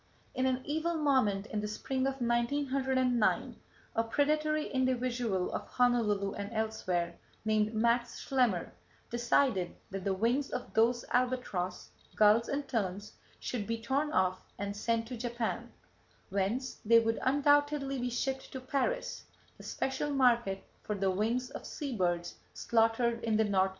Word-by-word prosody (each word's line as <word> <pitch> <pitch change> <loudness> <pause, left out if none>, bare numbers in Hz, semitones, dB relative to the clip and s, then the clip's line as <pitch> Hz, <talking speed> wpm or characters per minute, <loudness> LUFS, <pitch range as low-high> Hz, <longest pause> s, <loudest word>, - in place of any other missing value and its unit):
In 260 0 +1
an 260 0 0
evil 320 +3 -1
moment 260 -10 +2
in 215 -1 -3
the 210 - -2
spring 260 +5 -2
of 270 - -1
1909, 255 0 +1 0.4
a 225 - +3
predatory 305 +5 +1
individual 245 -6 0
of - - -4
Honolulu 220 -5 +2
and 200 +1 -5
elsewhere, 200 -6 -2 0.3
named 215 0 +1
Max 235 +2 +1
Schlemmer, 245 -10 +1 0.4
decided 240 -5 +1 0.2
that 195 -1 -4
the 195 0 0
wings 240 +8 +1
of 250 - -5
those 235 +2 +3
albatross, 245 -8 -1 0.2
gulls 215 +2 +5
and 280 0 -2
terns 205 -3 -2 0.3
should 220 -5 -3
be 230 0 -2
torn 275 +6 0
off 185 -5 +2 0.2
and 200 0 -3
sent 225 +2 0
to 255 - -4
Japan, 235 -1 -3 0.6
whence 200 +7 -1
they 230 +2 +6
would 225 0 +2
undoubtedly 290 0 +2
be 245 0 -1
shipped 265 +2 -2
to 260 - -4
Paris, 280 - -2 0.3
the - - -11
special 265 +2 -2
market 240 -8 +2 0.2
for 210 - -3
the 195 -1 +1
wings 230 +6 -1
of - - -7
sea 280 -4 -5
birds 175 -3 -1 0.2
slaughtered 230 +1 +2
in 220 -2 +2
the 220 - +4
North 195 -3 +3
Pacific. - - -2
235 Hz, 150 wpm, -32 LUFS, 210-265 Hz, 0.6 s, they